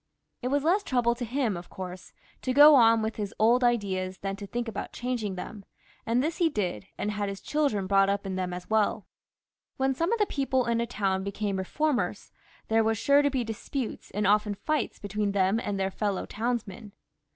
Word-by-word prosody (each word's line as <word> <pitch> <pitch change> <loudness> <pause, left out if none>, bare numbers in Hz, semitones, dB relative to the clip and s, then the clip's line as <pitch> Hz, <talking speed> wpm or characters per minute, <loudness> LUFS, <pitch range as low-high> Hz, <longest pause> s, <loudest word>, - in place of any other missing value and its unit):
It 250 - -2
was 280 +2 +1
less 360 +6 +3
trouble 245 -8 +1
to 240 +1 -6
him, 240 -3 -1
of 175 0 -8
course, 185 0 -8 0.3
to 255 - -1
go 295 +2 +9
on 230 -4 +6
with 220 0 -3
his 205 -2 -4
old 235 +4 +4
ideas 190 -6 0
than 195 0 -4
to 200 0 -8
think 240 +3 -3
about 210 -3 -5
changing 240 -6 -3
them; 200 +2 -7 0.4
and 240 +3 +2
this 320 +2 -2
he 340 -3 +3
did, 195 - -3
and 210 - -2
had 205 -1 -2
his 195 0 -6
children 280 -11 0
brought 195 0 +4
up 200 0 -1
in 190 -1 -3
them 185 -1 -2
as 180 0 -6
weU. 220 -1 +1 0.7
When 265 0 +1
some 335 - -1
of 465 - +2
the 420 - +3
people 265 -6 0
in 235 -1 +1
a 235 - -2
town 195 -4 -1
became 200 0 -2
reformers, 205 -1 -1 0.4
there 225 0 +3
were 220 0 +1
sure 280 +6 +4
to 285 - +2
be 260 -3 -1
disputes 225 +3 -5
and 210 +1 -2
often 210 +1 +3
fights 305 +9 -2
between 205 0 -2
them 195 +2 +2
and 205 -4 -3
their 190 0 0
fellow 200 -1 -2
townsmen. 220 -3 -4
220 Hz, 205 wpm, -28 LUFS, 195-255 Hz, 0.7 s, go